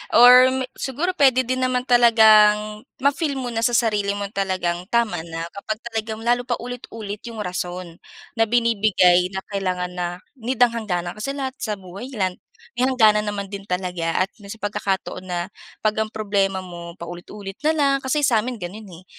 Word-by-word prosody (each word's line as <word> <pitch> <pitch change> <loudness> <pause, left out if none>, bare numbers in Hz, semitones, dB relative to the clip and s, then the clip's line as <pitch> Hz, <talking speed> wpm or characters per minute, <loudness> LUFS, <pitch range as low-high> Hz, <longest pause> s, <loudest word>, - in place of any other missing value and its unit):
or 255 +2 +7 0.2
siguro 290 +7 -1
puwede 265 -7 +4
din 255 +1 -2
naman 255 -1 0
talagang 215 -3 +5 0.2
ma-feel 280 +1 +1
mo 255 -2 -4
na 225 - -2
sa 235 +1 +2
sarili 210 -4 +1
mo 200 -1 -4
talagang 185 -3 -2
tama 230 -7 +1
na 165 0 -5
kapag 215 +2 -4
talagang 220 0 -4
lalo 245 +1 +1
paulit-ulit 230 -4 -5
'yong 225 -2 -5
rason 180 -1 -5 0.4
na 225 - +4
binibigay 210 -6 +3
na 190 0 -4
kailangan 185 -2 -2
na 180 -1 -3 0.3
need 245 +3 -3
ng 245 -1 +6
hangganan 180 -7 -3
kasi 275 +6 -3
lahat 265 -2 -3
sa 215 -2 -2
buhay 195 +4 -9
lan-may 200 +5 -3
hangganan 215 -5 +4
naman 200 -1 -4
din 200 0 -7
talaga 180 -2 -1
at 190 - -6
pagkakataon 200 -2 -4
na 175 -1 -2 0.4
'pag 215 0 +1
ang 220 0 0
problema 200 -3 -1
mo 170 -1 -9
paulit-ulit 190 +4 -9
na 310 +1 +2
lang 280 -2 +3
kasi 270 +3 -1
sa 240 -5 +4
amin 245 +3 -3
gano'n 205 +3 -8
eh 180 0 -13
215 Hz, 165 wpm, -22 LUFS, 185-245 Hz, 0.4 s, or